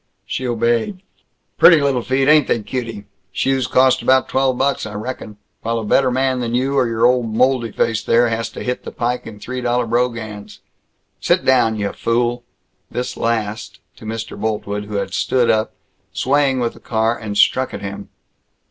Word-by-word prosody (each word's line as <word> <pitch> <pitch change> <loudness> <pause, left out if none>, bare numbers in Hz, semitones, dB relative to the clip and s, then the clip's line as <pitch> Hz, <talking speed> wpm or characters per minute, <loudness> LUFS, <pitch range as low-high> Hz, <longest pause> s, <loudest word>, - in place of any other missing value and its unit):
She 130 - -3
obeyed. 120 - 0 0.6
"Pretty 165 -3 +8
lil 140 -3 +1
feet, 135 +2 0
ain't 150 -2 +5
they, 115 - 0
cutie! 115 -4 -5 0.3
Shoes 135 -2 0
cost 130 0 +3
about 130 0 +3
twelve 130 -1 +1
bucks, 135 -3 0
I 105 - -8
reckon. 110 -1 -6 0.2
While 115 +1 -1
a 115 - -3
better 130 +5 +3
man 130 0 0
than 120 -1 -2
you 135 +3 0
or 115 -3 +2
old 125 -2 +2
moldy 125 -2 +2
face 115 0 0
there 120 +1 +3
has 115 0 -2
to - - -6
hit 125 0 -3
the - - -7
pike 120 +1 -2
in 105 -2 -10
three 130 +3 -5
dollar 120 0 0
brogans. 115 -3 -3 0.6
Sit - - +1
down, 125 -4 +3
yuh 100 -1 -2
fool!" 120 +1 -1 0.5
This 125 +1 -4
last 110 -4 -2 0.2
to - - -12
Mr. 115 0 -5
Boltwood, 105 -1 -3
who 105 0 -7
had 100 - -2
stood 125 -2 +2
up, 110 0 -1 0.4
swaying 135 -1 +1
with 120 -1 -1
the - - -15
car, 115 0 0
and 105 -3 -5
struck 130 +4 +3
at - - -7
him. 100 0 -7
120 Hz, 180 wpm, -19 LUFS, 110-130 Hz, 0.6 s, Pretty